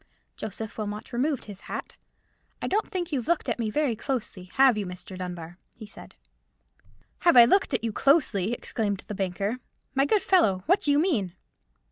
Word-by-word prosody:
Joseph 220 +1 -6
Wilmot 210 +2 -5
removed 270 +3 0
his 205 -2 -9
hat. - - -7 0.6
"I - - -4
don't 425 +3 0
think 355 -3 -3
you've 265 -4 -2
looked 340 -1 +1
at - - -1
me 225 -2 -1
very 280 0 0
closely, 230 -7 -4
have 265 -3 +6
you, 205 -3 -3
Mr. 180 +1 -8
Dunbar?" 175 -1 -7 0.2
he 225 - -10
said. 205 - -12 1.0
"Have 345 -7 +4
I 240 - +11
looked 315 +1 +3
at 230 - 0
you 225 -2 -2
closely!" 235 - +2
exclaimed 210 -4 -2
the - - -5
banker. 195 +4 -2 0.3
"My 270 0 +3
good 415 +5 +2
fellow, 200 - +3
what 370 +4 +4
do 290 - +2
you 285 - +4
mean?" 265 - +1
230 Hz, 180 wpm, -26 LUFS, 200-285 Hz, 1.0 s, I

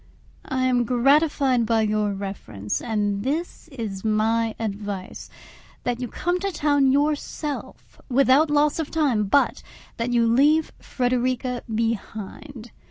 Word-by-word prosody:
I 260 -1 0
am 250 -1 +2
gratified 265 0 +2
by 225 -1 +2
your 210 -1 0
reference, 195 - -5
and 205 -3 -1
this 310 +9 -3
is 225 -10 -6
my 220 +1 +1
advice: 205 -3 -5 0.5
that 245 -1 -1
you 250 - -3
come 350 +8 -2
to 395 +1 -2
town 285 -4 +2
yourself, 295 +1 -3
without 275 +4 +4
loss 295 +1 +2
of 315 - -2
time, 270 -10 +1
but 280 +9 +2 0.4
that 235 +1 -2
you 235 -1 +3
leave 290 +7 +3
Frederica 250 0 -1
behind. 225 +2 -4
245 Hz, 125 wpm, -24 LUFS, 220-285 Hz, 0.5 s, without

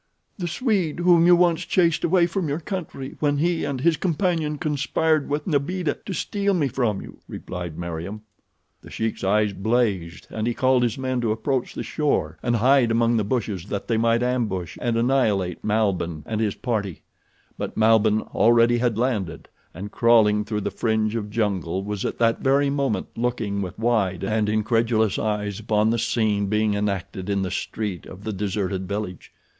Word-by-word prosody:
"The 175 - -2
Swede 180 - 0
whom 175 -1 +5
you 175 - +8
once 175 -2 +2
chased 170 -3 +2
away 175 0 +4
from 175 -2 -2
your 145 +3 -1
country 165 -7 -6
when 145 -1 +1
he 170 +2 +1
and 135 -2 -2
his 165 +1 +3
companion 165 -3 0
conspired 155 +1 0
with 145 +1 -2
Nbeeda 160 +1 -1
to 195 - -3
steal 200 +4 0
me 150 -5 +1
from 115 -7 -1
you," - - -12
replied 90 -3 -6
Meriem. 85 +5 -5 0.6
The - - -13
Sheik's 110 -2 -3
eyes 105 +1 +2
blazed, 100 -5 -1
and 110 +1 -2
he 120 - -1
called 130 -1 +3
his 120 -2 0
men 130 -1 -1
to 115 -2 0
approach 120 +4 -2
the - - -3
shore 115 - -1
and 120 -1 +1
hide 125 +1 +4
among 115 +1 +2
the 110 - +1
bushes 100 -5 -2
that 100 -1 -4
they 115 - +1
might 115 +1 +2
ambush 105 -10 -1
and 120 -2 0
annihilate 110 -8 +1
Malbihn 95 -7 0
and 110 +3 -2
his 105 -3 0
party; 105 - -3 0.5
but - - -5
Malbihn 110 -1 +4
already 120 +1 +4
had 120 -3 0
landed 110 -9 -2 0.2
and 100 +4 -8
crawling 110 -3 +4
through 105 0 -3
the - - -2
fringe 110 -2 0
of 105 -2 -3
jungle 95 -4 -1
was 105 -1 -4
at - - -3
that 115 -1 +2
very 140 +1 +2
moment 140 -5 0
looking 115 -4 -1
with 90 0 -5
wide 105 -6 0
and 105 +1 0
incredulous 110 -1 +1
eyes 105 -2 -2
upon 110 0 +1
the 115 - 0
scene 110 -3 +1
being 105 +1 +1
enacted 100 -1 -3
in 100 -1 0
the 90 - -3
street 100 -6 -4
of 95 +2 -11
the 110 - -3
deserted 95 -1 -2
village. 100 -3 -5
110 Hz, 180 wpm, -23 LUFS, 100-135 Hz, 0.6 s, you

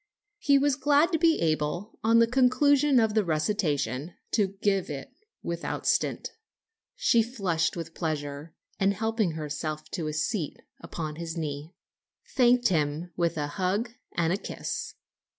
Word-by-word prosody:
He 280 -6 +4
was 280 0 +2
glad 290 +5 +3
to 325 - +1
be 330 -1 +4
able, 160 +5 -1
on 225 +1 +5
the 230 - +7
conclusion 265 +3 +4
of 220 -2 +2
the 215 -1 +3
recitation, 155 -3 -1 0.2
to 200 -3 0
give 195 -3 +1
it 140 -2 -6 0.3
without 170 0 -4
stint. - - 0 0.6
She 230 - +3
flushed 190 -9 -1
with 165 -1 -6
pleasure, 150 -2 -4 0.2
and 200 +1 +2
helping 220 -4 0
herself 155 0 -5
to 165 -5 -3
a 155 - -3
seat 160 0 -2 0.2
upon 155 -2 -6
his 170 0 -5
knee, 150 +1 -5 0.6
thanked 245 -2 +4
him 155 0 -1
with 170 -2 0
a 150 - 0
hug 195 +9 -1 0.2
and 175 +4 0
kiss. - - -5
180 Hz, 145 wpm, -27 LUFS, 155-230 Hz, 0.6 s, the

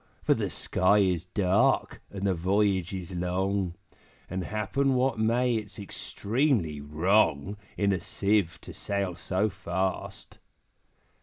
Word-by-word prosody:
For - - +4
the - - -2
sky 95 +3 +2
is 90 -4 +2
dark, 95 +1 +1
and 100 -1 -5
the 95 - +3
voyage 95 +1 +1
is 95 -2 -6
long, 90 +1 -1 0.6
And 95 -1 -2
happen 130 +6 0
what 125 -2 +1
may, 120 +3 +2
it's 110 -2 -4
extremely 100 - -1
wrong 80 +3 +2 0.2
In 100 -1 +2
a 95 - -1
Sieve 100 -1 0
to - - -10
sail 100 -2 -2
so 95 +5 0
fast!' 95 -1 -4
95 Hz, 130 wpm, -28 LUFS, 90-105 Hz, 0.6 s, For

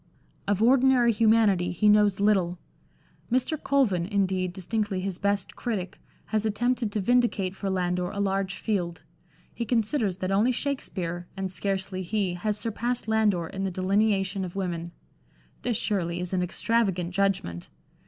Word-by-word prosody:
Of 205 +1 +1
ordinary 255 -1 +5
humanity 215 -5 +3
he 180 +5 +1
knows 210 -2 +4
little. 190 -4 +2 0.7
Mr. 255 +5 +1
Colvin, 210 -12 +2
indeed, 190 -3 0
distinctly 200 +1 -2
his 185 -1 -4
best 200 -1 -1
critic, 200 -7 -4 0.3
has 215 -1 +2
attempted 230 +1 0
to 215 - 0
vindicate 210 -4 +1
for 195 0 -3
Landor 180 -1 0
a 200 - -5
large 195 -1 0
field; 180 -6 -2 0.5
he 235 - -3
considers 225 -3 0
that 185 0 -2
only 210 +6 +3
Shakspere, 185 -10 -3
and 190 -1 -3
scarcely 190 0 -2
he, 190 0 -1
has 210 +4 -2
surpassed 235 +2 -2
Landor 215 -6 +2
in 195 +4 -5
the 195 - 0
delineation 195 +1 +1
of 180 -1 -6
women. 175 -3 -3 0.7
This, 240 -3 0
surely, 175 -5 -1
is 180 +1 -4
an 185 - +1
extravagant 185 -2 0
judgment. 190 - -1
195 Hz, 145 wpm, -27 LUFS, 185-220 Hz, 0.7 s, ordinary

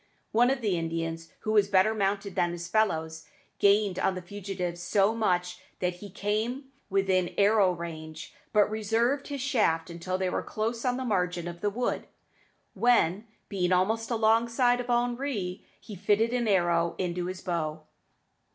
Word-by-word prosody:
One 240 +3 +4
of 265 -1 0
the 195 -6 0
Indians, 165 0 -3
who 215 - -2
was 210 -2 +4
better 200 +2 +4
mounted 200 -1 -1
than 175 0 +1
his 170 0 -6
fellows, 160 -7 0 0.3
gained 200 -2 +3
on 190 - +1
the 185 - -5
fugitives 180 -2 -5
so 195 +4 +2
much 180 -5 0 0.2
that 180 -1 -1
he 205 +2 -9
came 220 +8 -2 0.2
within 190 -2 +1
arrow 200 -2 +4
range, 160 -2 -7 0.2
but 210 -1 +4
reserved 225 +6 0
his 280 -2 -4
shaft 190 -12 +1
until 180 +2 -3
they 190 0 -1
were - - -1
close 225 +3 -3
on 250 0 +1
the 260 - -3
margin 180 -5 -1
of 175 0 -7
the 205 - +1
wood, 240 +4 -2 0.7
when, 225 -4 +2 0.2
being 185 -3 -1
almost 220 +5 +1
alongside 230 +2 +3
of 245 - -9
Henri, 240 -6 -1 0.2
he 215 - -11
fitted 205 +5 +2
an 240 -2 0
arrow 175 -4 +2
to 180 -1 -2
his 185 0 -5
bow. 160 -3 -3
200 Hz, 160 wpm, -28 LUFS, 175-225 Hz, 0.7 s, One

